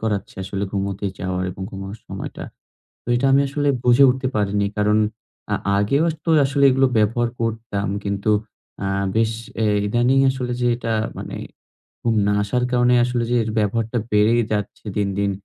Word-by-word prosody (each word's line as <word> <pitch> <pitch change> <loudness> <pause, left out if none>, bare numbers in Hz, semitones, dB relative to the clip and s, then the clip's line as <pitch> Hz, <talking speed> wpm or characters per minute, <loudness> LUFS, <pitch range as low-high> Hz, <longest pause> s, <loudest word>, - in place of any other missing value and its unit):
করাচ্ছে 105 -3 -2
আসলে 95 +1 -4
ঘুমোতে 100 0 -2
যাওয়ার 90 0 -2
এবং 95 +1 -8
ঘুমানোর 95 +2 -7
সময়টা। - - -6 0.6
তো - - -75
এটা 130 +3 +1
আমি 135 - +5
আসলে 145 +1 0 0.2
বুঝে 125 +3 +6
উঠতে 130 +1 -1
পারিনি। 100 -1 +1
কারণ, 105 +1 +3 0.5
আ - - +3 0.2
আগেও 140 +10 +2 0.2
তো 165 - 0 0.2
আসলে 140 +1 +2
এগুলো 135 +1 +3
ব্যবহার 115 +3 +2
করতাম 110 -3 -2 0.2
কিন্তু, 100 +1 -1 0.5
অ্যা 95 - -2 0.3
বেশ 110 0 +2 0.3
এ - - +3 0.2
ইদানিং 120 +5 +2
আসলে 125 -2 -3
যে 120 - +1
এটা 115 -1 -3 0.3
মানে - - -6 0.7
ঘুম 115 -1 +1
না 105 - +2
আসার 125 +4 -1
কারণে 125 0 +3
আসলে 120 -1 0
যে - - +3
এর 110 - -4
ব্যবহারটা 110 +3 0
বেড়ে 105 +2 +4 0.2
যাচ্ছে 105 0 -3
দিন, 100 -1 +1
দিন। 100 -1 +1
110 Hz, 165 wpm, -21 LUFS, 100-125 Hz, 0.7 s, বুঝে